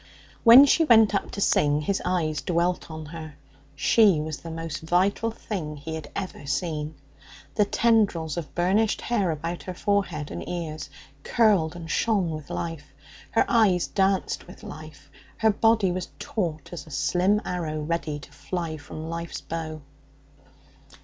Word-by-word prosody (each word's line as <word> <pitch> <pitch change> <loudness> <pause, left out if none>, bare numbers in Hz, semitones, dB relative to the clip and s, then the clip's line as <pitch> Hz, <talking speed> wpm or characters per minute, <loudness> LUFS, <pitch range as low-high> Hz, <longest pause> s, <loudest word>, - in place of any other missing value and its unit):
When 245 +4 +10
she 325 +4 +4
went 225 -7 +6
up 200 - -1
to 200 - -5
sing, 145 -5 +3
his 195 +6 -1
eyes 160 -5 0
dwelt 175 0 0
on 155 -1 -7
her. 155 -1 -8 0.4
She 200 +2 +4
was 155 0 -4
the 165 - -9
most 165 -2 -5
vital 185 +7 +1
thing 180 -9 -5
he 160 +3 -7
had 160 -2 -6
ever 185 -7 -5
seen. 155 0 -2 0.6
The 210 - +3
tendrils 200 -9 +2
of 160 -5 -6
burnished 195 +5 +2
hair 205 -7 0
about 165 +2 -3
her 185 - -7
forehead 180 -7 -1
and 85 0 -6
ears 155 -4 -4 0.3
curled 195 - +2
and 170 -2 -8
shone 195 0 +1
with 155 -1 -7
life; 165 -4 -5 0.4
her 225 - +2
eyes 205 -7 +3
danced 195 -1 0
with - - -13
life; - - -11 0.3
her 220 -1 +4
body 220 -2 +3
was 180 0 -4
taut 165 -8 -3
as 160 -3 -7
a - - -11
slim 175 +9 +2
arrow 160 -4 -3
ready 155 -1 -2
to 145 - -13
fly 165 +1 -4
from 155 +2 -8
life's 170 0 -5
bow. 155 -2 -5
170 Hz, 155 wpm, -25 LUFS, 155-200 Hz, 0.6 s, When